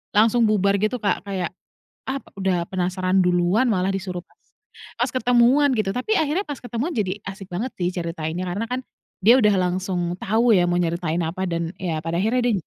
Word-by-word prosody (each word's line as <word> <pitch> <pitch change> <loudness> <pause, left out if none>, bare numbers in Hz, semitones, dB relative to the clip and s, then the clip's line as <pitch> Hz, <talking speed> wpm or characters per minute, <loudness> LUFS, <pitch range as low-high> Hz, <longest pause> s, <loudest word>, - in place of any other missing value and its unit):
langsung 230 +2 +4
bubar 200 -2 +2
gitu 215 +5 0
Kak, 200 - 0
kayak 185 -3 -2 0.6
ah 270 +1 -2 0.2
udah 185 -3 +1
penasaran 185 +1 0
duluan 180 +7 +2
malah 190 -1 +1
disuruh 185 -2 -4
pas. - - -33 0.6
Pas - - +1
ketemuan 250 +3 +4
gitu, 215 -3 0
tapi 400 - 0
akhirnya 315 +6 0
pas 290 -2 -5
ketemuan 245 +7 -3
jadi 200 -2 -1
asik 195 -1 -7
banget 220 +9 -3
sih 175 -1 +1
ceritainnya, 165 0 -3
karena 205 +6 -2
kan 255 - 0 0.5
dia 230 - +9
udah 210 -2 +4
langsung 180 -1 -1
tahu 225 +3 +3
ya 180 - +4
mau 175 - +1
nyeritain 170 -1 -1
apa 165 +4 -4
dan 170 0 -2
ya 170 -4 -1
pada 165 +1 -1
akhirnya 235 +4 +1
dia 240 - +3
195 Hz, 185 wpm, -23 LUFS, 175-235 Hz, 0.6 s, dia